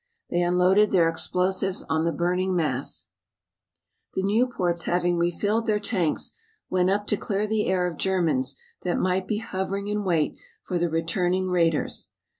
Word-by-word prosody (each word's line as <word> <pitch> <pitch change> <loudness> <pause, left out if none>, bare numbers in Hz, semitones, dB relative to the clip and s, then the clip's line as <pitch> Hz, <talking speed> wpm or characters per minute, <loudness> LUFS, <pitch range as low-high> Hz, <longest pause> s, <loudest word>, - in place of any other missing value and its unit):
They 175 - +2
unloaded 180 +4 +4
their 175 -4 +4
explosives 185 +3 0
on 160 0 +1
the 170 - +2
burning 180 +2 0
mass. 145 -6 -1 1.1
The 190 - 0
Nieuports 195 -5 +1
having 175 0 +1
refilled 205 +7 0
their 210 -1 +2
tanks 185 -7 -1 0.4
went 185 0 +3
up 205 +2 +1
to 210 - +1
clear 205 +1 -1
the 215 0 0
air 185 -1 +2
of 175 -3 -3
Germans 155 -9 +1 0.3
that 180 - -1
might 185 0 0
be 215 - 0
hovering 200 -1 -3
in 210 0 -1
wait 170 -5 +1 0.3
for 180 - -2
the 175 0 +1
returning 175 +3 0
raiders. 165 -3 +1
180 Hz, 155 wpm, -25 LUFS, 170-195 Hz, 1.1 s, unloaded